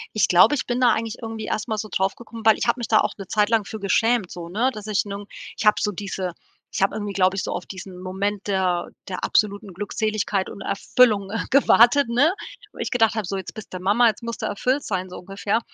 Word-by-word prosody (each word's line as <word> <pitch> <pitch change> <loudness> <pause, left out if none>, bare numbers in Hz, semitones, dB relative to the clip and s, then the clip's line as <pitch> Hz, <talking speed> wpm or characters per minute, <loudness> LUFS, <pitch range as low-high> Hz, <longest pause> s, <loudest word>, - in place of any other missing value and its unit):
Ich 215 - +3
glaube, 185 +11 +6
ich 275 - -3
bin 245 0 -1
da 245 -2 +6
eigentlich 225 0 -2
irgendwie 225 -1 -5
erst 215 +2 -2
mal 220 - -1
so 215 - -4
drauf 190 0 0
gekommen, 230 -1 -11
weil 220 -1 +6
ich - - -2
hab 235 - +3
mich 240 -2 -4
da 215 - +5
auch - - 0
'ne 195 -2 -8
Zeit 210 +2 +2
lang 225 -2 +3
für 220 0 -7
geschämt, 220 +1 +1
so, 170 -1 -8
ne, 225 +8 +1
dass 210 -1 -8
ich 210 -1 0
nun 200 0 -6 0.3
ich - - -3
hab 210 - +5
so 210 - 0
diese 190 -2 -4 0.4
ich - - -2
hab 195 - +3
irgendwie, 205 -1 -4
glaube 185 0 +2
ich, 195 - -2
so - - -3
auf 180 - -4
diesen 185 -1 -9
Moment 195 +2 -3
der 185 -3 0 0.2
der 185 -2 -5
absoluten 205 -2 0
Glückseligkeit 205 0 -1
und 200 - -9
Erfüllung 205 0 +2 0.2
gewartet, 265 -1 +5
ne, 280 +9 +3 0.4
wo - - -15
ich - - -3
gedacht 225 -3 +3
hab: 220 -3 -2
„So 195 +2 -3
jetzt 190 - -7
bist 215 -3 -10
du 185 - -4
Mama, 205 +6 +4
jetzt 220 +1 -1
musst 230 0 -5
du - - -2
erfüllt 255 +7 0
sein“, 185 -2 -3
so 180 - -8
ungefähr. 200 +4 -2
210 Hz, 250 wpm, -23 LUFS, 195-225 Hz, 0.4 s, glaube